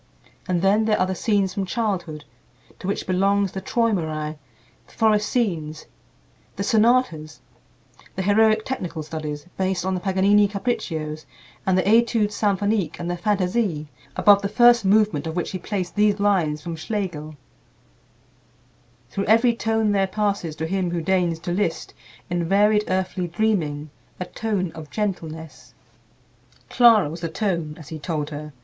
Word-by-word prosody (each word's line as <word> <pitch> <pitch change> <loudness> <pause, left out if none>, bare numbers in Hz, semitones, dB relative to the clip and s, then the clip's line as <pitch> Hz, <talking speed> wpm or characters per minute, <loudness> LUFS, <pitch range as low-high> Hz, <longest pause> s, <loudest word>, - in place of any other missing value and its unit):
And 180 -1 0
then 205 +3 +3
there 215 -1 +2
are 185 - +3
the 190 - -2
"Scenes 195 -1 0
from 195 -1 -3
Childhood," 175 -7 -3 0.5
to - - -6
which 200 - -2
belongs 195 +1 +1
the 190 - -5
"Träumerei"; 160 -11 -1 0.5
the - - -20
"Forest 210 -2 +2
Scenes," 165 -10 -2 0.7
the 200 - -3
"Sonatas;" 210 -9 +2 0.8
the 190 - -2
heroic 215 +2 +3
technical 175 -11 -4
studies, 150 -1 -6
based 185 -2 -1
on 190 - 0
the 185 - -1
Paganini 195 +2 +3
"Capriccios," 175 -8 -3 0.4
and 185 -1 +3
the 185 - +2
"Études 225 0 +3
Symphoniques," 205 -2 0
and 175 0 -3
the - - -1
"Fantasie," 185 -3 0 0.3
above 205 -1 +5
the 200 - -2
first 240 +1 +5
movement 200 -6 +2
of 160 - -4
which 175 - -2
he 185 - -4
placed 185 -4 -4
these 210 0 +2
lines 175 -7 +1
from 170 -1 -5
Schlegel: 160 -4 -4 1.8
"Through 195 - -2
every 230 +3 +4
tone 220 -2 0
there 195 -1 +2
passes, 200 -5 -2
To 160 - -3
him 185 +1 -1
who 170 -1 -2
deigns 175 -2 +1
to 175 - -4
list, 175 -3 -2 0.3
In 175 -1 -1
varied 210 +2 +3
earthly 185 -1 -1
dreaming, 160 -6 -1 0.3
A 180 - -3
tone 195 -4 -2
of 155 -2 -10
gentleness." 160 -7 -5 1.0
Clara 230 - +6
was 165 +3 -7
the 165 - -2
"tone," 170 -4 -2
as 155 -3 -12
he 160 - -6
told 150 -1 -3
her. 150 +1 -7
190 Hz, 155 wpm, -23 LUFS, 165-210 Hz, 1.8 s, Clara